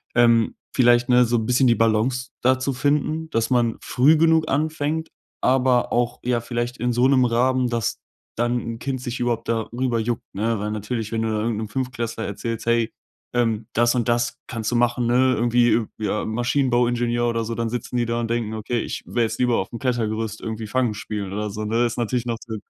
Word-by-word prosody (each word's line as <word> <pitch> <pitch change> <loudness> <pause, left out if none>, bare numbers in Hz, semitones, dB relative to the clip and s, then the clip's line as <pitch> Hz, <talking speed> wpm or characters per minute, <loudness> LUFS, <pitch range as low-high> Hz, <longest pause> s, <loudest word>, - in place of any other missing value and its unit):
ähm, 115 -1 +4 0.2
vielleicht, 120 -1 +4
ne, 125 -1 +5
so 120 +1 0
'n 110 - -1
bisschen 125 +3 +3
die 120 - +4
Balance 115 +3 +1
da 130 +1 +3
zu 130 +1 -2
finden, 150 +4 0
dass 115 -4 -1
man 120 -2 +2
früh 145 +6 +3
genug 160 0 +3
anfängt, 155 +2 -1 0.3
aber 130 -1 +2
auch, 120 0 0
ja, 120 -1 0
vielleicht 120 +1 -3
in 125 +2 0
so 120 +2 +3
'nem 130 -2 +4
Rahmen, 125 +2 +2
dass 115 -2 -2 0.4
dann 120 +1 +1
'n 115 0 -6
Kind 130 -1 -3
sich 120 -1 -4
überhaupt 120 -2 -1
darüber 115 +2 -1
juckt, 115 0 -2
ne? 110 +3 0
Weil 105 +1 -3
natürlich, 110 +1 -3
wenn 115 -1 -1
du 115 - 0
da 110 -1 -1
irgend 115 0 -1
'nem 110 0 -3
Fünftklässler 115 -1 -3
erzählst: 115 +3 -4
„Hey, 115 -1 +1 0.4
ähm, 115 -3 0
das 120 +1 +3
und 125 -2 0
das 120 0 0
kannst 115 -2 -3
du 120 - +1
machen, 120 0 +1
ne? 130 +2 +3
Irgendwie, 120 +1 +3
äh, 115 - +2
ja, 105 0 -1
Maschinenbauingenieur 120 0 +1
oder 115 -1 -1
so“, 115 +1 -4
dann 115 0 -1
sitzen 125 +1 -4
die 120 - +1
da 115 0 -1
und 115 - -3
denken: 115 -2 -1
„Okay, 110 +2 -2
ich - - -4
wäre 120 - 0
jetzt 110 - -2
lieber 125 -2 +2
auf - - -2
dem 115 - -7
Klettergerüst 110 -4 -1
irgendwie 110 -1 -5
Fangen 125 0 0
spielen“, 105 -2 -5
oder 105 +1 -2
so 105 +2 -5
ne? 115 +3 +1
Das 120 -1 0
ist - - -10
natürlich 120 0 -1
noch 120 -1 -2
so 110 -2 -5
120 Hz, 215 wpm, -23 LUFS, 115-125 Hz, 0.4 s, ne